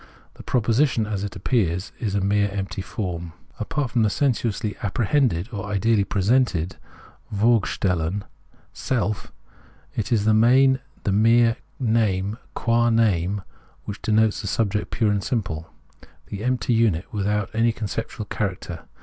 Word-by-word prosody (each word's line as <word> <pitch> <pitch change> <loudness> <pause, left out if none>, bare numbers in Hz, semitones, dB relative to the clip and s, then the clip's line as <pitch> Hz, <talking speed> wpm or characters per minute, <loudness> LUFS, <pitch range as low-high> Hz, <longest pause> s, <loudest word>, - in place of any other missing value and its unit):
The - - -12
proposition 120 0 +2
as 105 -2 -3
it 100 - -5
appears 90 -2 0
is 100 -3 -2
a 100 - +1
mere 100 +1 +2
empty 95 -1 -4
form. 85 -5 -5 0.3
Apart 130 +3 -2
from 120 - +2
the 110 - +3
sensuously 110 -3 0
apprehended 110 - +1
or 100 -3 -5
ideally 105 +1 +2
presented 100 -4 +1 0.5
{vorgestellten) 100 -4 +1 0.5
self, 110 -5 -2 0.6
it 110 - -2
is 115 -3 +3
in - - -3
the 110 - +4
main 130 +4 +5 0.2
the 100 - 0
mere 115 +3 +4 0.2
name 110 -3 +1 0.2
qua 120 +1 +2
name 100 -4 +2 0.4
which 105 - -6
denotes 110 0 +2
the 100 - -5
subject 105 +1 0
pure 110 -3 +1
and 100 -1 0
simple, 85 -10 -3 0.6
the 100 +1 -5
empty 125 0 +1
unit 110 -5 +1
without 105 -1 -1
any 115 +1 +3
conceptual 110 0 -4
cha 105 - -1
racter. 85 -2 -9
105 Hz, 140 wpm, -23 LUFS, 100-115 Hz, 0.6 s, main